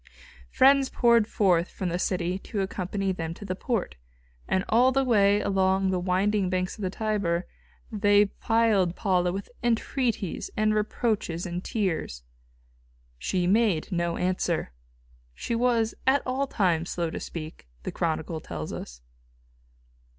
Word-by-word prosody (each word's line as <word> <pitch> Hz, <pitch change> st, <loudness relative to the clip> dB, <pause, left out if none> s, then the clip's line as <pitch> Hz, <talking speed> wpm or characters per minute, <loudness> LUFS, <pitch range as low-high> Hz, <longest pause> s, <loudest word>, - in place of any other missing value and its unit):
Friends 270 Hz, 0 st, +5 dB
poured 235 Hz, -3 st, +3 dB
forth 180 Hz, -6 st, +2 dB
from 185 Hz, -, -4 dB
the 175 Hz, +1 st, -2 dB
city 180 Hz, 0 st, -1 dB
to 200 Hz, 0 st, -4 dB
accompany 195 Hz, +1 st, -2 dB
them 165 Hz, -2 st, -4 dB
to 205 Hz, -, -10 dB
the 185 Hz, -, -2 dB
port, 220 Hz, -, -2 dB, 0.5 s
and 190 Hz, 0 st, 0 dB
all 245 Hz, +4 st, +4 dB
the 270 Hz, +1 st, +2 dB
way 205 Hz, -5 st, +4 dB
along 190 Hz, 0 st, +1 dB
the 185 Hz, -, 0 dB
winding 190 Hz, +2 st, +1 dB
banks 185 Hz, 0 st, -1 dB
of 215 Hz, -, -11 dB
the 185 Hz, -, -1 dB
Tiber 195 Hz, -4 st, -1 dB, 0.5 s
they 205 Hz, -1 st, +4 dB
plied 210 Hz, -4 st, +1 dB
Paula 180 Hz, -3 st, +1 dB
with 195 Hz, +2 st, -6 dB
entreaties 235 Hz, -, -1 dB
and 215 Hz, 0 st, +2 dB
reproaches 210 Hz, -5 st, -1 dB
and 175 Hz, 0 st, -4 dB
tears. 165 Hz, -, -2 dB, 1.0 s
She 180 Hz, -, -1 dB
made 200 Hz, -3 st, +2 dB
no 170 Hz, -1 st, -1 dB
answer. 180 Hz, -, -1 dB, 0.6 s
She 235 Hz, -, -4 dB
was 230 Hz, -1 st, +2 dB
at 275 Hz, +2 st, +4 dB
all 265 Hz, +2 st, -1 dB
times 175 Hz, -8 st, 0 dB
slow 170 Hz, -2 st, -2 dB
to -, -, -5 dB
speak, 155 Hz, -, -8 dB, 0.2 s
the -, -, -4 dB
chronicle 160 Hz, 0 st, -2 dB
tells 75 Hz, -, -6 dB
us. -, -, -8 dB
195 Hz, 145 wpm, -27 LUFS, 175-220 Hz, 1.0 s, Friends